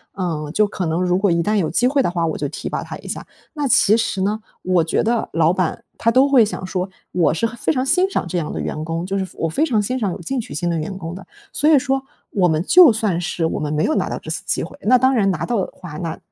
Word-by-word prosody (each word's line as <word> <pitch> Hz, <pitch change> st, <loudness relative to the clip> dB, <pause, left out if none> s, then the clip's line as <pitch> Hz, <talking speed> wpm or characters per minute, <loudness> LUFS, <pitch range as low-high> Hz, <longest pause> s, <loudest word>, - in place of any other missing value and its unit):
呃 165 Hz, -6 st, -3 dB
就 210 Hz, -, +3 dB
可 190 Hz, -3 st, -4 dB
能 165 Hz, +2 st, 0 dB
如 180 Hz, 0 st, +2 dB
果 200 Hz, +1 st, +2 dB
一 170 Hz, -1 st, +2 dB
旦 210 Hz, +3 st, +1 dB
有 175 Hz, -6 st, +1 dB
机 240 Hz, +9 st, +3 dB
会 275 Hz, +1 st, +2 dB
的 -, -, +1 dB
话， 170 Hz, -2 st, 0 dB
我 160 Hz, -, -2 dB
就 -, -, -2 dB
提 -, -, -5 dB
拔 -, -, -3 dB
他 -, -, -7 dB
一 -, -, -12 dB
下。 -, -, -5 dB, 0.3 s
那 295 Hz, -3 st, -1 dB
其 215 Hz, -3 st, +5 dB
实 225 Hz, -4 st, -1 dB
呢， 210 Hz, +3 st, 0 dB, 0.2 s
我 180 Hz, -2 st, +2 dB
觉 160 Hz, -, 0 dB
得 230 Hz, 0 st, 0 dB
老 165 Hz, 0 st, +3 dB
板 185 Hz, +5 st, -1 dB
他 230 Hz, -, +2 dB
都 265 Hz, +3 st, +4 dB
会 255 Hz, -5 st, +6 dB
想 205 Hz, -, -5 dB
说， 185 Hz, 0 st, -3 dB, 0.2 s
我 175 Hz, -3 st, +2 dB
是 170 Hz, -, 0 dB
很 230 Hz, +1 st, -4 dB
非 235 Hz, -, 0 dB
常 255 Hz, -2 st, 0 dB
欣 360 Hz, +7 st, +3 dB
赏 390 Hz, -, -1 dB
这 180 Hz, -, -2 dB
样 155 Hz, -3 st, -2 dB
的 -, -, -3 dB
员 155 Hz, -, -4 dB
工， 165 Hz, +1 st, -3 dB
就 195 Hz, +1 st, -2 dB
是 190 Hz, -, -1 dB
我 165 Hz, -, -1 dB
非 290 Hz, -, +1 dB
常 230 Hz, -9 st, +1 dB
欣 255 Hz, +5 st, -2 dB
赏 205 Hz, -5 st, 0 dB
有 -, -, -7 dB
进 260 Hz, +10 st, -2 dB
取 225 Hz, -, -6 dB
心 175 Hz, +4 st, -1 dB
的 170 Hz, -, 0 dB
员 170 Hz, +5 st, -4 dB
工 165 Hz, -2 st, -6 dB
的。 190 Hz, -, -10 dB, 0.3 s
所 300 Hz, -, +2 dB
以 310 Hz, -, +7 dB
说 270 Hz, 0 st, 0 dB, 0.3 s
我 185 Hz, -3 st, +2 dB
们 160 Hz, -1 st, +1 dB
就 340 Hz, -, +7 dB
算 210 Hz, -6 st, 0 dB
是 170 Hz, -1 st, -2 dB
我 160 Hz, -, -1 dB
们 150 Hz, 0 st, -2 dB
没 150 Hz, -, +1 dB
有 315 Hz, -, +1 dB
拿 -, -, 0 dB
到 -, -, -3 dB
这 -, -, -7 dB
次 -, -, -3 dB
机 -, -, -1 dB
会 -, -, -9 dB
那 250 Hz, +4 st, +5 dB
当 260 Hz, +1 st, +3 dB
然 210 Hz, -6 st, +2 dB
拿 -, -, -2 dB
到 240 Hz, -, -1 dB
的 -, -, -11 dB
话， 170 Hz, -5 st, -9 dB
那 165 Hz, -3 st, -4 dB
195 Hz, 320 characters per minute, -20 LUFS, 170-240 Hz, 0.3 s, 以